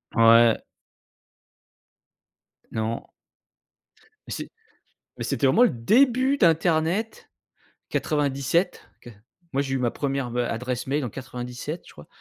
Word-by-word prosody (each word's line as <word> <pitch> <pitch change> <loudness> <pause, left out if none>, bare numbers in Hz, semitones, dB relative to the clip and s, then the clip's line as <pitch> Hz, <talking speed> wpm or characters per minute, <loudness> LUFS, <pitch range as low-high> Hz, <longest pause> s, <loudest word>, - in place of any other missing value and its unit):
Ouais. 115 0 +6 2.1
Non. 110 +1 -3 1.2
Mais - - -8
c'est - - -6 0.7
mais - - -4
c'était 140 - 0
vraiment 220 - +4
le 245 - +5
début 255 - +3
d'internet 170 - +1 0.6
97, 150 +4 0
qua 120 - -11 0.4
moi, 135 - +1
j'ai 135 -1 -3
eu 135 - 0
ma 120 -2 0
1re, 135 -3 -2
heu, 125 - +1
adresse 125 +2 -3
mail 140 +1 -1
en 120 - -4
97, 125 - -6
je - - -14
crois. 75 - -14
135 Hz, 120 wpm, -25 LUFS, 120-170 Hz, 2.1 s, Ouais